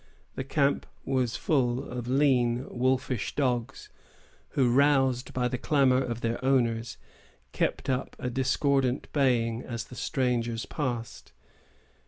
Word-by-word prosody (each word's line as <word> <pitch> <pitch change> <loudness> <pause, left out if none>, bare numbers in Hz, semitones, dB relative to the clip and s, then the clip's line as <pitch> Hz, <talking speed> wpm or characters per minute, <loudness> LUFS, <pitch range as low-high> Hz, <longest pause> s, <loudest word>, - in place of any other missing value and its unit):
The 130 - -4
camp 140 +1 +1 0.2
was 130 -4 0
full 130 -4 0
of 120 -1 -5
lean, 125 -2 +2
wolfish 130 -1 -1
dogs, 125 -5 -1 0.7
who, 130 -3 +4
roused 135 -2 +3
by 125 -1 0
the 125 0 -3
clamor 135 -3 +3
of 120 -1 -4
their 115 +2 -2
owners, 120 -3 +1 0.5
kept - - -1
up 130 -1 -2
a 125 - -3
discordant 135 0 +1
baying 120 -5 +2
as 115 -3 -5
the 125 - -12
strangers 120 -5 -1
passed. 120 -6 -4
125 Hz, 125 wpm, -28 LUFS, 120-135 Hz, 0.7 s, who